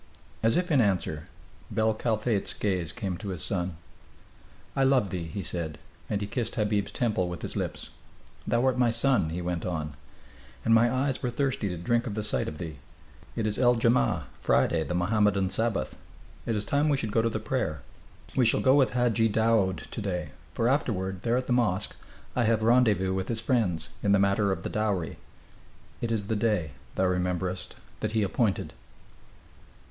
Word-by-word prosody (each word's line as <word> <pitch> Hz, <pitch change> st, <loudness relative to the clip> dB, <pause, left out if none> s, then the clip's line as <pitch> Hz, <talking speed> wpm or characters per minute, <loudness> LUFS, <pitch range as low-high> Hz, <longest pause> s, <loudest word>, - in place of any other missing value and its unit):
As 115 Hz, +1 st, +3 dB
if 180 Hz, -1 st, 0 dB
in 140 Hz, -4 st, +5 dB
answer, 90 Hz, -7 st, 0 dB, 0.4 s
bel 110 Hz, 0 st, +2 dB
Kalfate's 110 Hz, -1 st, +1 dB
gaze 90 Hz, -5 st, -1 dB
came 95 Hz, -6 st, -4 dB
to 105 Hz, -, -8 dB
his 90 Hz, -5 st, -2 dB
son. 90 Hz, -3 st, -1 dB, 1.0 s
"I 135 Hz, -, +3 dB
love 130 Hz, -8 st, +3 dB
thee," 90 Hz, -3 st, -3 dB
he 95 Hz, +5 st, -5 dB
said, 80 Hz, -3 st, -3 dB, 0.3 s
and 105 Hz, -1 st, -1 dB
he -, -, -1 dB
kissed 115 Hz, +2 st, -3 dB
Habib's 105 Hz, -2 st, 0 dB
temple 110 Hz, -8 st, 0 dB
with 85 Hz, -3 st, -7 dB
his -, -, -4 dB
lips. -, -, -4 dB, 0.6 s
"Thou 120 Hz, +2 st, +2 dB
art 130 Hz, -1 st, +2 dB
my 120 Hz, -2 st, +4 dB
son," 115 Hz, -6 st, +2 dB
he 85 Hz, +2 st, -4 dB
went 85 Hz, -2 st, -2 dB
on, 80 Hz, -4 st, -3 dB, 0.7 s
"and 115 Hz, -, +4 dB
my 115 Hz, +1 st, +5 dB
eyes 130 Hz, +1 st, 0 dB
were 125 Hz, -, 0 dB
thirsty 125 Hz, -4 st, -1 dB
to 90 Hz, -, -4 dB
drink 120 Hz, +9 st, 0 dB
of 105 Hz, -, -4 dB
the 110 Hz, -, -2 dB
sight 105 Hz, -, 0 dB
of 75 Hz, -, -5 dB
thee. 80 Hz, -3 st, -6 dB, 0.6 s
It 115 Hz, -, -1 dB
is 105 Hz, -1 st, -1 dB
el 120 Hz, -1 st, +5 dB
jammaa." 115 Hz, +1 st, +2 dB, 0.2 s
[Friday, 80 Hz, -1 st, +2 dB
the 90 Hz, -, -3 dB
Mohammedan 100 Hz, +1 st, +2 dB
Sabbath.] 110 Hz, -12 st, -1 dB, 0.5 s
"It 115 Hz, -, +1 dB
is 105 Hz, 0 st, -2 dB
time 145 Hz, +5 st, +2 dB
we 145 Hz, -, +3 dB
should 110 Hz, -5 st, -3 dB
go 115 Hz, -, +3 dB
to 115 Hz, -, +1 dB
the 110 Hz, -, -3 dB
prayer. 105 Hz, -, -2 dB, 0.5 s
We 130 Hz, -, +4 dB
shall -, -, +3 dB
go 130 Hz, -, +5 dB
with 135 Hz, -3 st, +4 dB
Hadji 120 Hz, -2 st, +3 dB
Daoud 110 Hz, -3 st, +2 dB
to -, -, -4 dB
day, 90 Hz, -7 st, -3 dB, 0.2 s
for 115 Hz, -, +1 dB
afterward, 95 Hz, -9 st, 0 dB
there 120 Hz, +1 st, +1 dB
at 130 Hz, -, -1 dB
the 125 Hz, -, +1 dB
mosque, 105 Hz, -5 st, +1 dB, 0.4 s
I 120 Hz, -, +2 dB
have 110 Hz, 0 st, +2 dB
rendezvous 110 Hz, -6 st, +3 dB
with 95 Hz, 0 st, -2 dB
his 115 Hz, -2 st, +1 dB
friends, 105 Hz, -, 0 dB
in 100 Hz, -, +3 dB
the -, -, +6 dB
matter 100 Hz, +1 st, +2 dB
of 90 Hz, -3 st, -3 dB
the -, -, -3 dB
dowry. 100 Hz, -7 st, -1 dB, 0.8 s
It 115 Hz, -, -1 dB
is 110 Hz, -3 st, -1 dB
the 110 Hz, -, -1 dB
day, 105 Hz, -8 st, 0 dB, 0.2 s
thou 95 Hz, -, +2 dB
rememberest, 90 Hz, 0 st, -1 dB, 0.2 s
that -, -, -2 dB
he 110 Hz, -2 st, +2 dB
appointed." 100 Hz, +1 st, 0 dB
105 Hz, 190 wpm, -28 LUFS, 90-120 Hz, 1.0 s, the